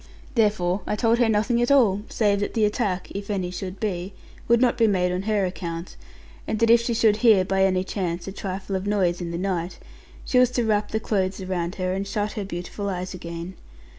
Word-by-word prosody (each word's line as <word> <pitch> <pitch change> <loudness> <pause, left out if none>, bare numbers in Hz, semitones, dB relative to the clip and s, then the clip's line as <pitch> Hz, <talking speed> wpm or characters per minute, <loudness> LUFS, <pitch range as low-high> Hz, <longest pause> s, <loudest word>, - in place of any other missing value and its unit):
Therefore 205 -5 +1
I - - 0
told 230 +1 +2
her 235 -2 +4
nothing 220 +3 +2
at 240 - +1
all, 225 -8 +4
save 205 -3 +1
that 205 - -3
the 220 -2 +3
attack 205 -3 -1
(if 200 +1 -6
any 185 -3 -2
should 185 +1 -6
be) 190 -2 -3 0.3
would 235 0 +4
not 245 -1 +3
be 230 - +3
made 180 -3 +1
on 180 +1 -1
her 205 -3 +2
account; 170 -2 -5 0.5
and 220 - -1
that 230 +1 +4
if 235 0 +6
she 235 0 -1
should 220 -2 +4
hear, 215 -5 +5
by 190 +1 +1
any 185 -1 +2
chance, 180 -3 -3
a - - -4
trifle 190 0 -4
of 190 +1 -3
a - - 0
noise 185 -4 +1
in 170 - -4
the 170 - -3
night, 180 -1 -2 0.5
she 250 - +3
was 250 -1 +5
to 240 - +2
wrap 210 -1 +1
the 220 - -1
clothes 195 -3 -1
around 185 -1 -3
her, 185 -1 -1
and 195 +1 -3
shut 210 +1 -2
her 210 - -4
beautiful 195 +2 -5
eyes 185 0 -4
again. 170 0 -7
195 Hz, 225 wpm, -24 LUFS, 185-215 Hz, 0.5 s, if